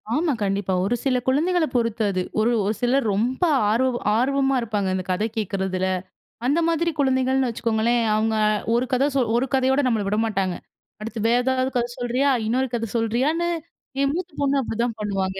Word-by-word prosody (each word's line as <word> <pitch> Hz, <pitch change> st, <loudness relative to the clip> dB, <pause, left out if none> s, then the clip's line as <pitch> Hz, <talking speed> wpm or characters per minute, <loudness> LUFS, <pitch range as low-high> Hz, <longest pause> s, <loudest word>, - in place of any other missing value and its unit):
ஆமா. 310 Hz, -1 st, +1 dB
கண்டிப்பா. 195 Hz, -1 st, -1 dB
ஒரு 220 Hz, +6 st, +1 dB
சில 255 Hz, -2 st, +2 dB
குழந்தைகள 325 Hz, +5 st, +2 dB
பொறுத்து 230 Hz, -2 st, 0 dB
அது. 185 Hz, -1 st, -1 dB, 0.2 s
ஒரு 225 Hz, +3 st, +3 dB
ஒரு 210 Hz, +2 st, 0 dB
சிலர் 245 Hz, +1 st, +2 dB
ரொம்ப 240 Hz, -, -1 dB, 0.3 s
ஆர்வம் 245 Hz, +3 st, +1 dB, 0.2 s
ஆர்வமா 270 Hz, +2 st, +1 dB
இருப்பாங்க. 210 Hz, -4 st, -1 dB
இந்த 185 Hz, -, -2 dB
கதை 210 Hz, +5 st, 0 dB
கேட்குறதில. 190 Hz, -2 st, -1 dB, 0.6 s
அந்த 290 Hz, +6 st, +2 dB
மாதிரி 335 Hz, 0 st, +1 dB
குழந்தைகள்ன்னு 260 Hz, -1 st, +2 dB
வச்சுக்கோங்களேன். 230 Hz, +1 st, 0 dB
அவங்க 220 Hz, +1 st, +1 dB
அ -, -, +3 dB, 0.2 s
ஒரு 245 Hz, +2 st, +1 dB
கதை 265 Hz, +3 st, +3 dB
சொ -, -, +3 dB, 0.2 s
ஒரு 260 Hz, +3 st, 0 dB
கதையோட 265 Hz, +2 st, +2 dB
நம்மள 220 Hz, -5 st, 0 dB
விட 210 Hz, +2 st, 0 dB
மாட்டாங்க. 195 Hz, -4 st, -1 dB, 0.5 s
"அடுத்து 225 Hz, +1 st, -5 dB
வேற 240 Hz, +1 st, +4 dB
ஏதாவது 260 Hz, 0 st, +1 dB
கதை 240 Hz, 0 st, 0 dB
சொல்றியா?" 255 Hz, +3 st, +1 dB, 0.2 s
இன்னொரு 255 Hz, +3 st, 0 dB
கதை 230 Hz, -2 st, -3 dB
சொல்றியான்னு 265 Hz, +10 st, 0 dB, 0.5 s
என் 275 Hz, 0 st, +2 dB
மூத்த 360 Hz, 0 st, -4 dB
பொண்ணு 280 Hz, 0 st, +2 dB
அப்டிதான் 230 Hz, -1 st, -2 dB
பண்ணுவாங்க 195 Hz, -2 st, -2 dB
240 Hz, 170 wpm, -23 LUFS, 215-265 Hz, 0.6 s, வேற